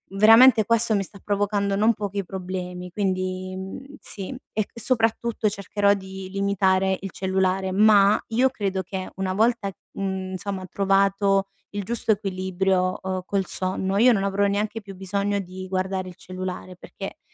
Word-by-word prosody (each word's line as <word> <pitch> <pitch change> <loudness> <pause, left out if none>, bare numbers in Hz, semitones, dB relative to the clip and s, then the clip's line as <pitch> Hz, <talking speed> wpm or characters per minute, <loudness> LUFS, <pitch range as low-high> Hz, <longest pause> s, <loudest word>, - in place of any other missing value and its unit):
veramente 225 +2 +7
questo 230 0 +4
mi 200 - +1
sta 200 +1 -11
provocando 200 0 0
non 220 +3 +4
pochi 200 -1 -3
problemi 180 -1 -6
quindi, 185 -1 -2
mhmm, 260 +10 -8
sì. 195 -2 -8 0.3
E 215 -1 -1
e 235 - -10
soprattutto 225 -2 +1
cercherò 200 0 +1
di 190 -1 -7
limitare 190 -1 +1
il 195 -1 -6
cellulare, 190 0 0
ma 205 0 +5
io 250 +4 +3
credo 195 -6 -2
che 185 +1 -5
una 190 -1 -2
volta, 220 0 +1 0.2
mhmm, 190 -1 -3
insomma 190 0 -4
trovato 195 0 +2 0.3
il 205 - -3
giusto 230 +2 0
equilibrio, 190 -2 0
uhm, 185 0 -3
col 195 0 -1
sonno, 190 +1 -2
io 245 +4 +6
non 195 -3 0
avrò 200 +1 +1
neanche 210 +2 -1
più 195 -1 -10
bisogno 200 +2 -1
di 185 0 -7
guardare 185 0 -2
il 180 - -12
cellulare 185 0 -6
perché - - -8
195 Hz, 155 wpm, -24 LUFS, 185-205 Hz, 0.3 s, veramente